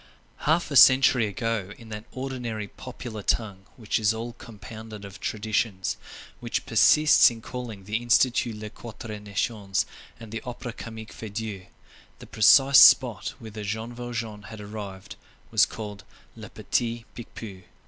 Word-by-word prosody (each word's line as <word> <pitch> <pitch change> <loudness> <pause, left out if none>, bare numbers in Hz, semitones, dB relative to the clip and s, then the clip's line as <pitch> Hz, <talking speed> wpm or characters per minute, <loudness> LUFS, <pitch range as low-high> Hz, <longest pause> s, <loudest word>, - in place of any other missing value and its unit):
Half 165 0 +2
a - - -2
century 130 -3 +7
ago, 105 -1 -3
in 115 -1 -14
that 105 0 -7
ordinary, 125 -5 -4
popular 120 -4 -8
tongue, 100 -2 -2
which 110 -3 -1
is 110 0 +2
all 115 +1 -5
compounded 110 -2 -10
of 100 0 -11
traditions, 105 -2 -1 0.4
which - - -3
persists 150 0 +6
in 115 -1 -8
calling 115 -4 -7
the 105 +3 -2
Institut 120 -1 +2
les 105 0 -8
Quatre 110 -2 -8
Nations, 100 0 -2 0.3
and 115 -2 -11
the 115 -1 -4
Opera 120 -1 -7
Comique 110 -2 -9
Feydeau, 105 -3 -6 0.5
the - - -12
precise 135 +5 +6
spot 120 -8 +6
whither 110 -2 -8
Jean 110 +3 -4
Valjean 115 -4 -5
had 110 - -9
arrived 100 -2 -8 0.3
was - - +5
called 105 -3 -8 0.3
le - - -10
Petit 115 -1 -2
Picpus. 110 -5 -9
110 Hz, 140 wpm, -26 LUFS, 105-120 Hz, 0.5 s, century